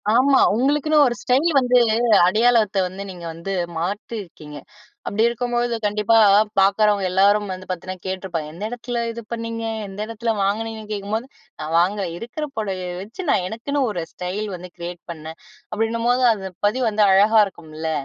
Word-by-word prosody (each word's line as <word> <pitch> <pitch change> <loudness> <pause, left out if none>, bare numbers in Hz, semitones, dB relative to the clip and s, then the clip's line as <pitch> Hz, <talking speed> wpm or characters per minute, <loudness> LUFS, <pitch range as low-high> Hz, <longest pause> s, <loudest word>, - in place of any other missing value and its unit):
ஆமா. 265 +2 +5 0.2
உங்களுக்குன்னு 290 +4 +3
ஒரு 240 - -1
ஸ்டைல் 270 +7 +2
வந்து 250 -1 +3 0.5
அடையாளத்தை 215 0 +3
வந்து 190 +2 -7
நீங்க 175 -2 -9
வந்து 170 +4 -5 0.2
மாற்றியிருக்கீங்க. 175 -4 -5 0.5
அப்படி 215 +2 +1
இருக்கும்போது 240 0 -1
கண்டிப்பா 210 +2 +2 0.4
பார்க்குறவங்க 200 +1 +3
எல்லாரும் 200 +2 +3
வந்து 185 0 -7
பார்த்தீன்னா 185 +1 -4
கேட்டுருப்பாங்க, 185 -5 -4
எந்த 175 +5 -8
இடத்தில 240 0 -4
இது 235 +1 -7
பண்ணீங்க 230 0 -4 0.2
எந்த 195 +1 -10
இடத்தில 230 +1 -2
வாங்கினீங்கன்னு 215 +2 -2
கேட்கும்போது, 210 +3 -3 0.3
"நான் 155 +1 -4
வாங்கல, 195 +3 +2
இருக்கற 240 - -5
புடவைய 190 -4 -3
வச்சு 215 - -8
நான் 185 - +2
எனக்குன்னு 260 +8 -3
ஒரு 180 -5 -3
ஸ்டைல் 190 +4 -4
வந்து 180 +1 -10
கிரியேட் 175 0 -7
பண்ணேன்" 160 0 -9 0.3
அப்படின்னும்போது 230 +3 0
அது 190 -3 -6 0.2
பதிவு 245 +5 +1
வந்து 215 0 +2
அழகா 210 +3 +5
இருக்கும்ல. 160 -4 -6
210 Hz, 145 wpm, -21 LUFS, 185-235 Hz, 0.5 s, ஆமா